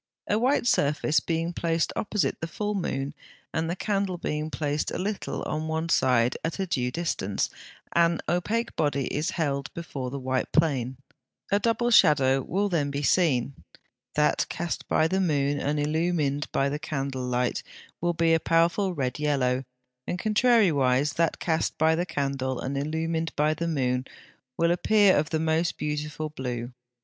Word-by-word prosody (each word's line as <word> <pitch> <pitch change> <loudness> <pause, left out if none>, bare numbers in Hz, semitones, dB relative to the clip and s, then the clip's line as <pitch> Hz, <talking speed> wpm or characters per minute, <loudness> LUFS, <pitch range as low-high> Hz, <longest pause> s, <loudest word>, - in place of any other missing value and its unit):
A 210 - +2
white 255 +2 +2
surface 150 -6 +2
being 165 +1 -2
placed 165 -1 0
opposite 210 -1 -1
the 165 - -2
full 210 +5 -3
moon, 140 -7 -2 0.4
and 160 +1 -1
the 175 - -1
candle 195 -2 -1
being 155 -2 -3
placed 150 -1 -1
a - - -3
little 200 +2 -3
on 155 +1 -3
one 160 +1 -2
side 125 -5 +3
at 165 - -2
a 195 - -1
due 125 -8 -1
distance, 125 - -2 0.4
an 170 0 +3
opaque 220 +7 -1
body 140 -3 0
is 150 +2 0
held 140 -4 -1
before 140 -6 -5
the 140 - -5
white 130 -1 -2
plane, 130 -6 +1 0.5
A 200 - +4
double 230 +2 +1
shadow 135 - +5
will 195 +9 0
then 160 -7 0
be 140 +1 -3
seen: 140 -6 +2 0.6
that 150 0 +2
cast 170 -1 -4
by 155 - +3
the 190 +3 0
moon 145 -5 +1
and 145 +1 -1
illumined 150 -1 0
by 135 - +1
the 145 +2 -2
candle 135 -4 -3
light 125 0 0 0.4
will 175 0 +1
be 165 0 +3
a 165 - +4
powerful 170 +4 +2
red 130 -1 -2
yellow; 135 -3 +1 0.4
and 180 - -2
contrariwise, 170 - +3
that 165 -1 +1
cast 160 -2 -1
by 160 +1 +4
the 175 +2 -1
candle 135 -4 -2
and 135 +2 -3
illumined 160 +3 -1
by 150 +1 +2
the 170 +2 -3
moon 130 -5 0 0.5
will 170 0 +3
appear 200 +2 +4
of 145 0 +1
the 160 - 0
most 160 +1 0
beautiful 150 +1 -3
blue. 125 -4 -4
155 Hz, 165 wpm, -26 LUFS, 140-170 Hz, 0.6 s, shadow